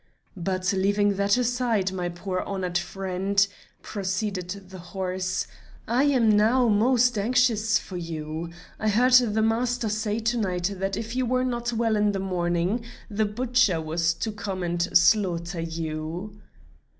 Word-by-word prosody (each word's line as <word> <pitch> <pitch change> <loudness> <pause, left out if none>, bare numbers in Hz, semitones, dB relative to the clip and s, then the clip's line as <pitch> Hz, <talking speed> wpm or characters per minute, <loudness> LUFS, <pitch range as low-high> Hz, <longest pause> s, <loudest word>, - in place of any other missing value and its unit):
"But 185 +1 -1
leaving 200 +1 +2
that 200 +2 +3
aside, 240 -5 +1
my 180 -2 -3
poor 185 +2 -4
horned 185 -3 -4
friend," 195 +2 0 0.4
proceeded 190 -2 -3 0.2
the 185 - -9
horse, 185 0 -3 0.4
"I 245 +5 +2
am 260 -6 +3
now 235 +4 +4
most 240 +2 +3
anxious 225 -1 +2
for 185 - -7
you. 160 -1 -5 0.3
I 215 - +1
heard 250 +5 +3
the 220 -4 +5
master 235 +1 0
say 215 0 -1
to 230 +1 0
night 180 -2 -1
that 195 +1 -2
if 225 +2 -5
you 255 -1 0
were 255 +1 +1
not 240 -1 -2
well 225 -1 +1
in 210 -1 +2
the 195 - -2
morning, 180 +3 -1 0.3
the 215 +1 +1
butcher 230 -4 +1
was 165 +1 0
to 220 - -3
come 200 -3 -4
and 175 0 -1 0.2
slaughter 175 -2 +2
you." 165 +5 -5
200 Hz, 150 wpm, -25 LUFS, 180-225 Hz, 0.4 s, the